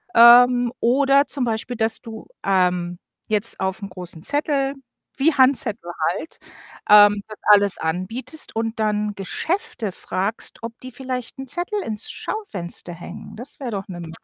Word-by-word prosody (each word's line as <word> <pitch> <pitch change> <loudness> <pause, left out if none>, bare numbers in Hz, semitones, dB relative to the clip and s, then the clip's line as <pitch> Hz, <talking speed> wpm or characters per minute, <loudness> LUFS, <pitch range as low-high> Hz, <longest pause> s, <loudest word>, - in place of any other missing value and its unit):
Ähm, 245 +1 +7
oder 275 +3 +3
zum 275 -3 -2
Beispiel, 235 +1 -2
dass 220 0 -1
du, 225 -2 -10 0.2
ähm, 180 -2 +1 0.3
jetzt 215 +1 +2
aufm 190 +1 -3
großen 180 -3 -9
Zettel 280 -2 0 0.4
wie 295 +3 +3
Handzettel 250 -9 +2 0.2
halt, 325 - -8 0.5
ähm, 205 -1 +7
das 215 - -10
alles 200 -1 +6
anbietest 190 - -4
und 225 0 -2
dann 210 -1 0
Geschäfte 235 - -3
fragst, 195 +5 -3
ob 230 +1 -8
die 255 0 -9
vielleicht 255 0 -6
'n 270 - -6
Zettel 360 - -2
ins 215 0 -5
Schaufenster 180 - -6
hängen. 170 - -10
Das 250 +7 -8
wär 250 -4 -4
doch 195 -2 -4
'ne 175 -2 -7
Möglichkeit. 165 -1 -10
225 Hz, 150 wpm, -22 LUFS, 195-260 Hz, 0.5 s, Ähm